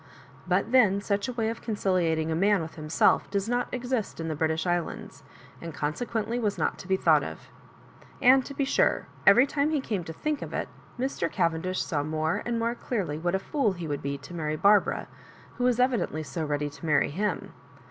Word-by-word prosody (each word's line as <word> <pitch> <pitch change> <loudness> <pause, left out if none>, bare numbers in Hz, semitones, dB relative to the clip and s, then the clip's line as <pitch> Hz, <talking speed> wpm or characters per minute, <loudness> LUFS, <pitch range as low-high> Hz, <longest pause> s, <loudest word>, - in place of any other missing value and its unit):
But 185 +5 +1
then 215 -7 +5
such 200 +1 -1
a 250 - -4
way 225 -2 -1
of 230 - -8
conciliating 175 -7 0
a - - 0
man 195 +1 +3
with 160 - -8
himself 155 0 +2
does 200 +1 -1
not 245 +1 -1
exist 245 -5 -2
in 165 0 -3
the 155 - -2
British 160 +2 0
Islands, 175 -2 -3 0.4
and 165 -2 -7
conse 150 +10 -2
quently 230 +2 -2
was 210 -3 0
not - - -1
to 185 - -10
be 190 0 +2
thought - - +4
of - - -8 0.7
And 260 +1 +6
to 280 - -8
be 275 - 0
sure, - - +2 0.2
every 250 - +8
time 285 +1 0
he 310 -2 +1
came 210 -8 -3
to - - -6
think 300 - -2
of - - -6
it, - - -2 0.3
Mr. 250 -9 -2
Cavendish 170 +3 0
saw 150 -4 -1
more 155 +2 -1
and 235 -1 0
more 230 +1 0
clearly 200 -11 -3
what 175 +3 0
a - - +3
fool 220 +1 0
he 175 -3 -6
would 145 -2 -3
be 140 0 -3
to 145 +5 -12
marry 155 -2 -2
Barbara, 200 +5 +3 0.5
who 245 - +1
was 250 -1 +2
evidently 245 - +1
so 160 +2 -4
ready 145 -1 -2
to 155 - -10
marry 150 -1 +3
him. 205 +7 -2
190 Hz, 210 wpm, -27 LUFS, 160-235 Hz, 0.7 s, every